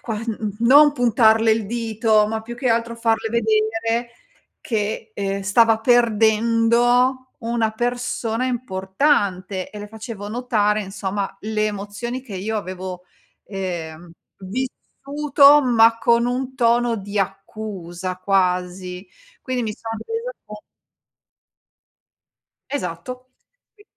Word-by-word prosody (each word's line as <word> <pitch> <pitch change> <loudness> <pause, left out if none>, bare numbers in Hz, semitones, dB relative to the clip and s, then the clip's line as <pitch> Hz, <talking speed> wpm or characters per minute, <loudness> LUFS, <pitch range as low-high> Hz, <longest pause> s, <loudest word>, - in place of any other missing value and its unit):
qua 225 -3 -4
mhmm, 225 0 -4
mhmm, 210 -2 -4
non 285 +5 +7
puntarle 225 -3 +4
il 220 -2 +1
dito, 220 -1 +1
ma 220 0 -2
più 240 +1 -8
che 255 0 -1
altro 230 0 0
farle 225 -1 0
vedere 225 +1 0 0.5
che, 220 0 -3
ehm, 200 0 -2
stava 225 +2 +4
perdendo 235 +2 +3
una 230 -1 0
persona 240 0 -2
importante 190 -4 -1
e 210 - -9
le 205 0 -8
facevo 220 -2 -8
notare 215 -3 0
insomma 195 0 -4
le 215 0 -1
emozioni 210 +5 -5
che 220 -7 -8
io 215 +4 -3
avevo, 185 -2 -6 0.4
ehm, 175 -4 -6 0.3
vissuto, 280 +7 +2
ma 230 -2 +4
con 235 +1 +3
un 255 +1 -2
tono 240 -1 +2
di 205 +1 -5
accusa 190 -3 -4
quasi. 180 0 -1 0.4
Quindi 255 -2 -2
mi 215 - -2
sono 225 0 -6
resa 460 +2 -4
con 210 0 -9 2.1
Esatto. 255 0 -5 0.5
I 415 - -17
225 Hz, 115 wpm, -21 LUFS, 200-240 Hz, 2.1 s, non